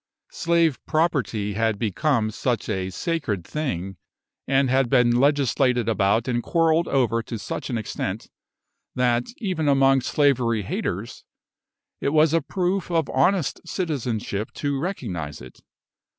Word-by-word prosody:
Slave 165 -4 +1
property 130 - 0
had 110 0 0
become 115 - 0
such 120 +2 -2
a 95 -3 -2
sacred 110 - -2
thing, 95 - -4 0.5
and 135 0 +3
had 130 -1 +2
been 125 -2 +4
legislated 130 -3 +2
about 110 +2 +2
and 120 -1 0
quarrelled 165 +3 +2
over 120 -4 +1
to 115 0 -6
such 100 - -5
an 120 - -1
extent, 105 -2 -4 0.7
that, 120 -1 +1
even 185 -9 -2
among 135 -1 +4
slavery 120 -6 +1
haters, - - -4 0.8
it 140 - -1
was 155 0 +4
a 165 - +3
proof 180 +5 -1
of 165 -3 0
honest 160 +4 +1
citizenship 120 - -3
to 145 -2 -2
recognise 95 - -4
it. 65 +1 -13
130 Hz, 130 wpm, -24 LUFS, 110-155 Hz, 0.8 s, been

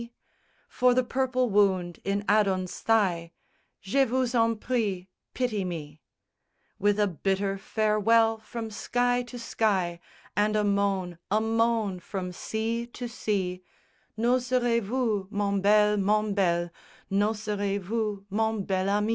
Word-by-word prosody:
_ 235 0 -10 0.6
For 250 -1 +2
the 255 - +3
purple 255 0 0
wound 190 -4 +2
in 200 +1 -1
Adon's 195 -3 +1
thigh; 180 -7 +1 0.5
Je 270 +8 +3
vous 255 0 0
en 230 -1 +3
prie, 210 -6 -2 0.3
pity 235 -6 -1
me; 155 -4 -6 0.8
With 205 0 +2
a 210 - +4
bitter 195 +2 -1
farewell 220 +2 +2
from 225 0 -6
sky 245 +3 0
to 245 0 -9
sky, 195 -7 0 0.4
And 210 +2 +2
a 210 - +2
moan, 200 -4 0
a 210 - +3
moan, 225 -3 +1
from 180 0 -5
sea 225 +5 -3
to 245 0 -6
sea; 195 -6 -2 0.6
_N'oserez 245 0 +2
vous, 215 -3 -1
mon 200 -1 0
bel, 210 +1 +4
mon 210 +1 +1
bel, 175 -3 +1 0.4
N'oserez 205 0 0
vous, 205 0 -3
mon 220 0 0
bel 190 0 0
ami? 210 +2 +1
210 Hz, 130 wpm, -27 LUFS, 195-230 Hz, 0.8 s, a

